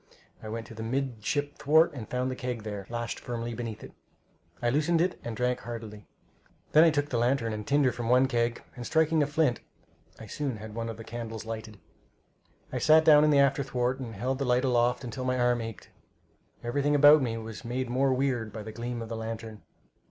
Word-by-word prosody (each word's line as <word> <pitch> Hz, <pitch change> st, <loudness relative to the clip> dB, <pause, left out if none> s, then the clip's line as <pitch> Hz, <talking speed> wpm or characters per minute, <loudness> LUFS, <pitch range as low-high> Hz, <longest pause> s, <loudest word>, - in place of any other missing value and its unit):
I 110 Hz, -, -7 dB
went 115 Hz, +1 st, -5 dB
to -, -, -11 dB
the 110 Hz, -, -8 dB
midship 135 Hz, +3 st, -2 dB
thwart, 160 Hz, +4 st, +4 dB
and 120 Hz, -6 st, -8 dB
found 125 Hz, +1 st, -1 dB
the -, -, -4 dB
keg 125 Hz, -4 st, -4 dB
there, 100 Hz, -3 st, -6 dB
lashed 120 Hz, 0 st, -4 dB
firmly 120 Hz, -1 st, -4 dB
beneath 115 Hz, -2 st, -6 dB
it. -, -, -10 dB, 0.7 s
I 120 Hz, -, +1 dB
loosened 155 Hz, +5 st, +2 dB
it 180 Hz, +2 st, 0 dB
and 115 Hz, -2 st, -5 dB
drank 125 Hz, 0 st, 0 dB
heartily. 110 Hz, -3 st, -8 dB, 0.6 s
Then 155 Hz, -, +7 dB
I 170 Hz, -, +7 dB
took 145 Hz, -1 st, 0 dB
the 120 Hz, -, 0 dB
lantern 120 Hz, -2 st, +1 dB
and 105 Hz, -1 st, -6 dB
tinder 140 Hz, -2 st, +3 dB
from 120 Hz, -1 st, -5 dB
the 125 Hz, +2 st, +5 dB
keg, 120 Hz, -2 st, -1 dB
and 120 Hz, -, -7 dB
striking 160 Hz, +4 st, +2 dB
the 145 Hz, -, +2 dB
flint, 145 Hz, -4 st, +1 dB, 0.6 s
I 110 Hz, -, -9 dB
soon 130 Hz, +2 st, -3 dB
had 105 Hz, 0 st, -9 dB
one 115 Hz, +1 st, -4 dB
of 115 Hz, -, -6 dB
the 115 Hz, -, -8 dB
candles 115 Hz, -1 st, -6 dB
lighted. 110 Hz, -1 st, -6 dB, 1.0 s
I -, -, -1 dB
sat 155 Hz, +1 st, +5 dB
down 150 Hz, -2 st, +7 dB
on 155 Hz, -, +4 dB
the 145 Hz, -, +4 dB
after 140 Hz, 0 st, +4 dB
thwart 125 Hz, -1 st, -1 dB
and 115 Hz, -4 st, -6 dB
held 130 Hz, +6 st, -2 dB
the -, -, 0 dB
light 125 Hz, +1 st, +2 dB
aloft 125 Hz, 0 st, +2 dB
till 130 Hz, -, -5 dB
my 130 Hz, 0 st, 0 dB
arm 120 Hz, -1 st, +2 dB
ached. 115 Hz, -1 st, -8 dB, 0.7 s
Everything 145 Hz, +5 st, +1 dB
about 145 Hz, +1 st, +8 dB
me 115 Hz, -3 st, -1 dB
was 110 Hz, 0 st, -8 dB
made 125 Hz, +2 st, -3 dB
more 130 Hz, +3 st, +1 dB
weird 130 Hz, -4 st, 0 dB
by 110 Hz, 0 st, -7 dB
the 110 Hz, -, -7 dB
gleam 120 Hz, +1 st, -5 dB
of 110 Hz, -, -9 dB
the 115 Hz, -, -4 dB
lantern. 110 Hz, -1 st, -6 dB
120 Hz, 215 wpm, -28 LUFS, 115-140 Hz, 1.0 s, about